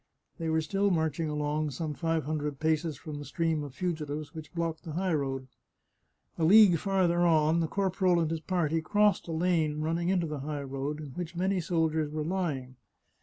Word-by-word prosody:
They 165 -1 -2
were 160 0 +2
still 195 +6 +1
marching 160 -2 0
along 150 0 -1
some 150 +3 -4
five 165 0 -1
hundred 150 -2 -3
paces 155 -1 0
from 150 0 -7
the - - -6
stream 165 -1 -1
of 140 -3 -8
fugitives 155 -4 -3
which 160 -1 -9
blocked 165 -1 -2
the 160 -4 -6
high 180 +1 0
road. 135 -3 -2 0.9
A - - +1
league 190 -1 +7
farther 185 -3 +1
on 160 -1 +4
the 165 - +1
corporal 185 -1 +1
and 165 -1 0
his 165 - -1
party 165 -2 0
crossed 205 +4 +2
a - - -4
lane 160 -2 +1
running 165 +3 0
into 185 -3 +2
the 150 -2 -4
high 145 +1 -4
road, 140 +2 -4
in 150 - -7
which 175 +5 -6
many 185 +1 +1
soldiers 160 -2 0
were 155 0 -3
lying. 150 -8 -2
160 Hz, 190 wpm, -29 LUFS, 150-175 Hz, 0.9 s, league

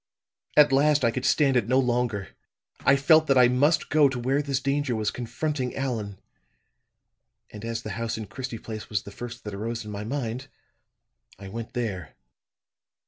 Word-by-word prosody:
At 150 -2 +7
last 145 0 +4
I 115 - +3
could 130 +2 -3
stand 140 -4 +3
it 120 -4 +2
no 130 +2 +3
longer. 120 -6 0 0.5
I 140 - +4
felt 155 +3 +5
that 135 - +4
I 125 -1 +7
must 145 +6 +2
go 150 -2 +5
to 130 - -4
where 130 +4 +1
this 140 -2 -1
danger 140 -2 0
was 110 -1 -1
confronting 130 +2 -3
Allan; 110 -7 -3 1.3
and 105 0 -9
as 115 0 -4
the 110 - -5
house 115 +3 -3
in 110 - -5
Christie 115 +4 -6
Place 110 -1 -8
was 105 -3 -1
the 100 - -10
first 120 +3 -8
that 105 - -6
arose 115 +3 -4
in 105 - -7
my 100 0 -5
mind, 125 +1 -4 0.9
I 95 0 -9
went 115 +3 -7
there. 95 - -4
120 Hz, 180 wpm, -26 LUFS, 110-135 Hz, 1.3 s, At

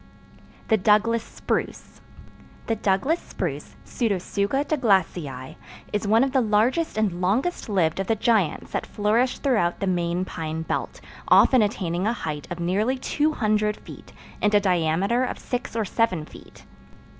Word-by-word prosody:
The 220 - +4
Douglas 215 +3 +3
Spruce - - -4 0.6
The 225 - 0
Douglas 215 - +1
Spruce - - -5
(Pseudotsuga 205 +4 -1
Douglasii) 180 - 0 0.4
is 210 0 -1
one 225 +4 +4
of 270 - 0
the 265 - +3
largest 230 +8 +1
and 195 -5 0
longest 230 - 0
lived 180 -4 +1
of 195 - -2
the 225 - +2
giants 215 -7 +1
that - - -3
flourish 225 +5 +1
throughout 215 -11 +1
the - - -1
main 175 -1 0
pine 160 -2 -4
belt, - - -4 0.3
often 255 -3 +6
attaining 190 -3 -1
a 230 - +1
height 155 -9 -5
of 175 - -5
nearly 205 +9 0
200 215 -8 0
feet, - - -13 0.3
and 210 0 +3
a - - +7
diameter 185 +5 +1
of 255 - -3
six 245 -2 -5
or 225 -2 0
seven 185 -6 0
feet. - - -15
210 Hz, 145 wpm, -24 LUFS, 180-235 Hz, 0.6 s, a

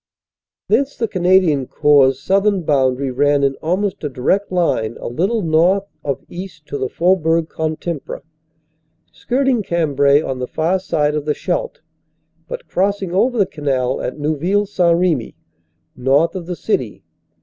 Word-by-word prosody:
Thence 280 0 +1
the 230 - 0
Canadian 180 - +2
Corps 140 -3 +4
southern 195 +3 +1
boundary 135 -2 +1
ran 145 +2 +2
in 135 -1 +2
almost 185 +4 -2
a 150 - -1
direct 165 +11 0
line 140 -11 0
a - - -6
little 190 - -1
north 170 +5 +3 0.2
of 140 -3 -3
east 175 -4 -9
to 140 - -4
the 130 -1 -2
Faubourg 165 -2 +1
Can 160 0 -2
timpre, 165 -3 -6 0.9
skirting 260 -1 0
Cambrai 145 -6 +2
on 135 -4 -4
the 125 - -3
far 170 +4 0
side 150 -5 0
of 150 -1 -3
the 150 - 0
Scheldt, - - -3 0.7
but - - -7
crossing 195 -1 -1
over 240 +6 +2
the 200 - +4
canal 135 -7 -2
at 125 - -4
Neuville 155 +7 0
St. 175 -4 +2
Remy, 170 -9 0 0.6
north 135 +6 +2
of 180 -3 -6
the 180 - -3
City. - - -2
165 Hz, 150 wpm, -18 LUFS, 140-190 Hz, 0.9 s, Corps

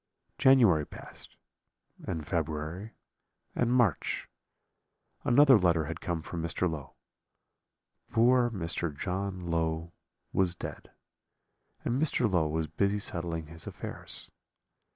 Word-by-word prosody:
"January 115 - +6
passed, - - -12 0.7
and 80 -2 -3
February, 80 +6 -3 0.6
and 120 -1 +1
March; 120 - +1 1.0
another 135 -1 +7
letter 85 -4 +3
had 80 +2 -6
come 85 -3 -2
from 85 +1 -5
Mr. 85 +2 0
Low; 80 -5 -6 1.1
poor 120 +1 +4
Mr. 85 -6 -2
John 95 +1 -3
Low 80 0 -1 0.4
was 95 -2 +2
dead, - - -7 1.0
and 125 +4 0
Mr. 135 -6 +2
Low 90 -6 +2
was 80 +1 -1
busy 100 +7 0
settling 85 -5 -3
his 80 +2 -11
affairs. - - -6
85 Hz, 110 wpm, -30 LUFS, 80-105 Hz, 1.1 s, another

